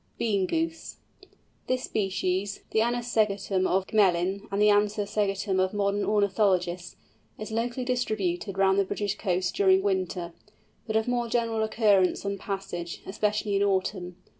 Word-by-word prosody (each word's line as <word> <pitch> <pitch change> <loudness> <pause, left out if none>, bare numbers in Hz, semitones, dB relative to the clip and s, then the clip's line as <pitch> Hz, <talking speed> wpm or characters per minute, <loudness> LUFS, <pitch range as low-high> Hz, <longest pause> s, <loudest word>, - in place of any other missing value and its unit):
BEAN 200 -5 +1
GOOSE. 325 - -3 0.7
This 255 0 0
species, 195 -1 -1
the 220 - +2
Anas 240 +1 0
segetum 200 -4 +1
of 190 +1 +1
Gmelin, 195 0 +1
and 200 - -1
the 210 0 +5
Anser 205 0 +2
segetum 200 -2 -1
of 185 +2 0
modern 205 0 0
ornithologists, 190 -4 +1 0.4
is 215 +1 -7
locally 235 +3 -2
distributed 205 -7 -1
round 195 0 +3
the - - +4
British 205 +1 -2
coasts 185 -3 -1
during 190 -1 +3
winter, 185 -3 -1 0.5
but 220 - -2
of 220 +1 +1
more 245 -1 0
general 230 -2 0
occurrence 210 -4 +2
on 200 -1 -2
passage, 190 -4 -5
especially 210 +1 -1
in 195 - +2
autumn. 185 -2 -1
200 Hz, 145 wpm, -27 LUFS, 190-220 Hz, 0.7 s, the